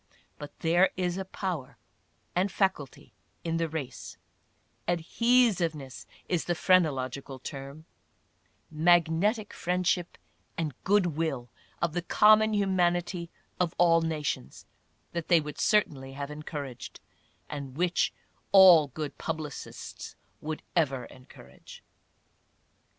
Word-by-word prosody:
But 145 0 -10
there 175 +3 +4
is 180 -1 -1
a 190 - -4
power 180 -8 -5 0.6
and 185 +2 +1
faculty 190 - -2 0.3
in 165 -1 -1
the 165 -1 -1
race 150 -5 -6 0.3
— - - -42
adhesiveness 175 - +1 0.2
is 175 -3 -1
the 175 - 0
phrenological 140 -7 +1
term 140 +3 -8 0.5
— - - -41 0.2
magnetic 175 +6 +2
friendship 180 0 -1 0.4
and 155 -4 -2
good 205 -1 +4
will 155 -7 -2 0.3
of 170 -2 0
the 175 - -1
common 215 +4 +5
humanity 175 -3 0 0.3
of 175 -2 0
all 165 -1 +5
nations 150 - -3 0.2
— - - -42
that 170 -2 -3
they 170 -2 +5
would 150 -1 -7
certainly 140 -11 +1
have 140 +1 -6
encouraged, 150 -4 -7 0.5
and 140 -2 -7
which 175 0 +1 0.4
all 185 -6 +8
good 145 +2 -6
publicists 155 -3 -6 0.3
would 155 0 -5
ever 135 -7 +1
encourage. 130 +1 -15
165 Hz, 115 wpm, -28 LUFS, 145-180 Hz, 0.6 s, all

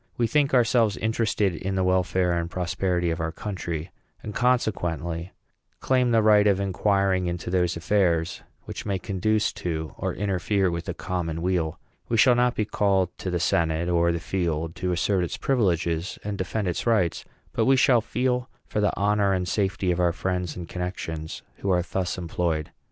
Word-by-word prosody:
We 120 - +2
think 140 +4 +2
ourselves 115 -4 +3
interested 110 -3 0
in 95 +4 -3
the 95 - +1
welfare 90 -1 +2
and 85 -1 -1
prosperity 90 -1 -1
of 80 - -3
our 80 0 -1
country; 85 -4 -5 0.3
and, 105 - -6
consequently, 90 -9 0 0.5
claim 130 -1 +2
the 115 -2 +3
right 105 -1 +6
of 100 -2 +3
inquiring 95 -1 +1
into 85 0 -3
those 90 -2 +1
affairs 85 -2 +1 0.2
which - - -7
may 100 -2 -1
conduce 105 +3 0
to 80 -2 -3
or - - -2
interfere 95 -1 0
with 85 0 -4
the 90 - -4
common 85 -3 -3
weal. 90 -4 0 0.3
We 115 - +1
shall 125 +3 +6
not 125 0 +2
be 110 - 0
called 95 -4 +1
to 95 - -3
the 90 -1 -1
senate 85 -1 +1
or 85 0 +3
the 85 - -2
field 80 -3 -2
to 90 - -1
assert 90 +2 +1
its 85 - -3
privileges 90 -8 0
and 105 0 -3
defend 100 +2 -2
its 90 - -2
rights, 105 -8 +2 0.3
but - - +1
we 135 - +5
shall 125 -2 +4
feel, 125 +2 -1 0.2
for 105 - -2
the 105 - +1
honor 100 0 +2
and 90 -1 -1
safety 95 +1 0
of 90 - -1
our 85 -1 +3
friends 90 -3 -2
and 85 -2 -7
connections 80 -3 -5
who 100 - -3
are 90 -2 +3
thus 95 0 -2
employed. 85 -3 -2
95 Hz, 180 wpm, -25 LUFS, 85-105 Hz, 0.5 s, right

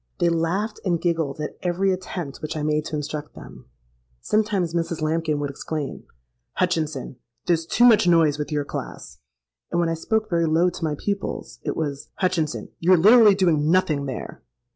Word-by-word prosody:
They 170 - +2
laughed 170 +6 -1
and 175 -4 0
giggled 160 -5 -1
at 150 - -6
every 185 +2 +1
attempt 180 -5 -6
which 155 +1 -4
I 150 - -3
made 150 0 0
to 155 - -4
instruct 150 0 -5
them. - - -12 0.5
Sometimes 205 - 0
Mrs. 170 -1 -2
Lambkin 155 0 0
would 145 -1 -2
exclaim, 145 +1 -5 0.5
'Hutchinson, 155 -7 -1 0.3
there's 165 -2 +1
too 240 - +2
much 220 -6 +6
noise 160 -4 +4
with 150 +1 -4
your 145 -1 -1
class;'—and 65 - -8
when 170 -1 +1
I - - 0
spoke 215 +6 -1
very 170 -4 +1
low 170 +3 +3
to 175 - -8
my 155 -2 0
pupils, 200 +3 -4
it - - -3
was, 145 -3 -4
'Hutchinson, 170 -5 -1
you're 180 +2 +5
literally 210 +3 +7
doing 160 -6 +2
nothing 155 -6 +2
there!' 130 - -6
165 Hz, 170 wpm, -23 LUFS, 150-180 Hz, 0.5 s, literally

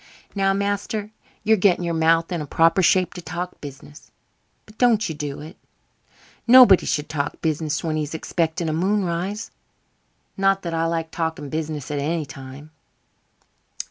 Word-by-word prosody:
Now, 195 -1 +2
master, 205 +1 -2 0.3
you're 220 0 +4
getting 180 -2 +3
your 170 -1 -1
mouth 165 +1 +2
in 175 - -1
the 150 - -5
proper 165 +6 +3
shape 185 0 +3
to 180 - -8
talk 175 +2 -6
business 145 +1 -11 0.6
but 215 +1 -19
don't 230 -4 +3
you 160 - -4
do 145 -2 -5
it. 155 +4 -11 0.9
Nobody 240 -6 +8
should 150 -1 -1
talk 145 -2 -3
business 155 0 -1
when 160 -2 -1
he's 150 +1 -3
expecting 165 +1 -2
a 155 - -1
moonrise. 190 +3 -1 0.8
Not 195 0 +2
that 170 -1 -4
I 165 0 0
like 165 -1 -2
talking 160 -3 -3
business 155 -3 -4
at 145 - -2
any 155 +2 -1
time." 135 +3 -11
165 Hz, 155 wpm, -22 LUFS, 155-195 Hz, 0.9 s, Nobody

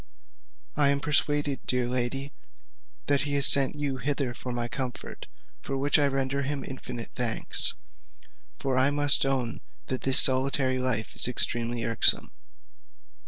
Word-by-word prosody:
I 145 -1 +2
am 140 0 0
persuaded, 145 -1 0
dear 125 -1 0
lady, 130 +3 -3 0.7
that 140 -1 +1
he 145 0 -3
has 140 0 +5
sent 140 +1 +6
you 145 -2 -3
hither 135 -1 -3
for 125 +1 -7
my 120 -1 -3
comfort, 125 0 -7 0.3
for 135 - -5
which 145 +3 +1
I 145 - +2
render 135 0 -2
him 140 0 -4
infinite 120 -3 -8
thanks; 120 -3 -2 0.8
for 130 -1 -2
I 130 +2 +3
must 145 -1 +1
own 130 -4 -3 0.3
that 130 - -3
this 135 0 +8
solitary 130 0 +2
life 125 -4 -2
is - - +5
extremely 120 -1 0
irksome." 115 - +3
135 Hz, 145 wpm, -26 LUFS, 125-140 Hz, 0.8 s, this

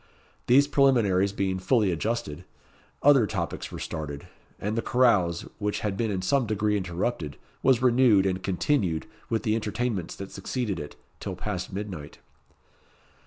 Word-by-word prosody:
These 140 +3 +6
preliminaries 110 -10 +3
being 95 -2 -1
fully 105 0 +2
adjusted, 90 -3 -2 0.6
other 135 -6 +6
topics 85 -6 -4
were - - -6
started, 75 -3 -5 0.3
and 105 +2 -2
the 115 - 0
carouse, 105 -11 +3 0.2
which 105 -1 -1
had 105 -2 -1
been 115 +2 -1
in 95 -3 -2
some 130 +4 +2
degree 105 0 +1
interrupted, 85 - -2 0.2
was 130 -2 +3
renewed, 120 -6 +5
and 95 -1 0
continued, 95 - 0 0.2
with 110 -2 0
the 110 - +1
entertainments 110 -3 -2
that 100 -1 -8
succeeded 100 -1 -3
it, 75 -1 -7 0.2
till 95 -2 -5
past 95 0 -4
midnight. 95 -7 -6
105 Hz, 145 wpm, -27 LUFS, 90-120 Hz, 0.6 s, These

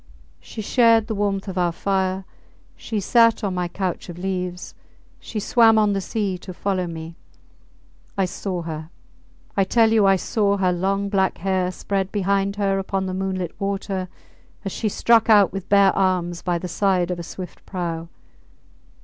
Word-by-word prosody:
She 215 - -8
shared 230 -1 +4
the 220 - -3
warmth 200 -1 -1
of 190 -1 -3
our 175 -1 +2
fire, 190 +1 -1 0.5
she 220 - -4
sat 230 +3 +4
on 195 -2 -1
my 180 -1 -1
couch 180 0 -4
of 175 - -7
leaves, 180 -1 -4 0.5
she 220 - -5
swam 225 +1 +4
on 210 -1 +3
the 195 - -1
sea 195 -1 -2
to 185 0 -9
follow 185 -2 -1
me.... 165 0 -7 1.0
I 195 - +2
saw 180 0 -4
her!... 160 -1 -6 0.7
I 195 - +3
tell 225 +3 +3
you 215 -3 +4
I 195 - +5
saw 200 +1 0
her 185 -2 +2
long 195 +3 0
black 190 -2 +1
hair 185 0 0
spread 195 +1 -2
behind 200 0 0
her 195 -1 0
upon 195 0 -2
the 185 - -3
moonlit 185 -2 -3
water 195 -1 -2 0.6
as 195 - -2
she 215 - -1
struck 230 +2 +3
out 205 -4 +6
with 195 -1 -6
bare 200 -1 +5
arms 180 -3 0
by 175 -1 0
the 180 - -5
side 185 -1 +1
of 175 - -3
a - - -3
swift 180 +2 -9
prau. 170 -3 -4
195 Hz, 175 wpm, -22 LUFS, 180-200 Hz, 1.0 s, out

